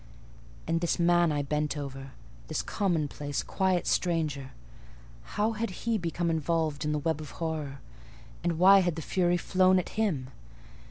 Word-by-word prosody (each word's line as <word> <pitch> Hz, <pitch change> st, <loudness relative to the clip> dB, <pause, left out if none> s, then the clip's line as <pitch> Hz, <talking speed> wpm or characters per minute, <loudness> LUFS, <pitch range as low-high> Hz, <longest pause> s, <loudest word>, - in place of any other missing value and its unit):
And 165 Hz, 0 st, 0 dB
this 170 Hz, -, +1 dB
man 175 Hz, -1 st, +4 dB
I 145 Hz, -1 st, 0 dB
bent 150 Hz, +1 st, -1 dB
over—this 135 Hz, +2 st, -7 dB
commonplace, 150 Hz, -6 st, -1 dB
quiet 190 Hz, -2 st, 0 dB
stranger—how 130 Hz, -, -3 dB
had 230 Hz, +1 st, -2 dB, 0.2 s
he 230 Hz, -2 st, +1 dB
become 170 Hz, 0 st, -1 dB
involved 160 Hz, -2 st, 0 dB
in 150 Hz, -, 0 dB
the 150 Hz, -, 0 dB
web 155 Hz, +1 st, -1 dB
of 150 Hz, -, -8 dB
horror? 155 Hz, -5 st, -4 dB, 0.6 s
and 170 Hz, -2 st, 0 dB
why 195 Hz, +3 st, +8 dB
had 175 Hz, -4 st, +1 dB
the 160 Hz, -, -5 dB
Fury 175 Hz, +1 st, +1 dB
flown 185 Hz, +1 st, +3 dB
at 185 Hz, -, -1 dB
him? 175 Hz, -13 st, -1 dB
160 Hz, 145 wpm, -29 LUFS, 145-175 Hz, 0.6 s, why